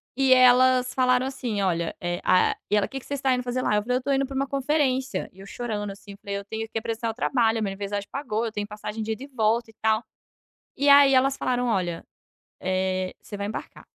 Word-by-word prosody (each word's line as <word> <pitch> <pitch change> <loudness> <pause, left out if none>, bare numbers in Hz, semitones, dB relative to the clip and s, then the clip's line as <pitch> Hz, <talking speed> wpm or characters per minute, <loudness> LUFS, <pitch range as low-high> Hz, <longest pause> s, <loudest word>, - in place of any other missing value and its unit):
E 265 -1 +4
elas 255 0 +5
falaram 255 0 +2
assim: 245 -6 -3
"Olha, 170 -3 -1
e 175 0 -2
a" 185 - +4 0.2
E 210 - +2
ela: 205 - +3
"Que 270 - -6
que - - -17
vocês 285 - -3
está 265 -1 +2
indo 250 - 0
fazer 250 +1 -2
lá?" 210 - +1
Eu 210 - +2
falei: 250 +4 -1
"Eu - - +2
estou 275 +2 -1
indo 270 0 +1
para 270 - -8
uma 275 +1 +1
conferência." 270 -5 0
E 190 - -19
eu 195 - -10
chorando, 210 -4 -4
assim, 200 +1 -12
eu 200 - -11
falei: 200 0 -4
"Eu 200 - -6
tenho 220 +1 -5
que - - -3
apressar 225 +1 -3
o - - -3
trabalho. 230 -2 +1
Minha 195 - -1
universidade 200 +1 -4
pagou, 235 -5 -2
eu 225 - -3
tenho 205 -1 -4
passagem 210 +1 -6
de 220 +1 -2
ida 255 - -8
e - - -8
volta 230 -2 0
e - - -32
tal." 220 +1 +2 0.7
E 285 - +1
aí 280 -1 +7
elas 270 +1 +3
falaram: 250 -1 -1
"Olha, 180 -6 -1 0.6
eh, 185 0 -1
você 205 - -9
vai 200 0 -3
embarcar." 215 - -7
225 Hz, 245 wpm, -25 LUFS, 205-255 Hz, 0.7 s, aí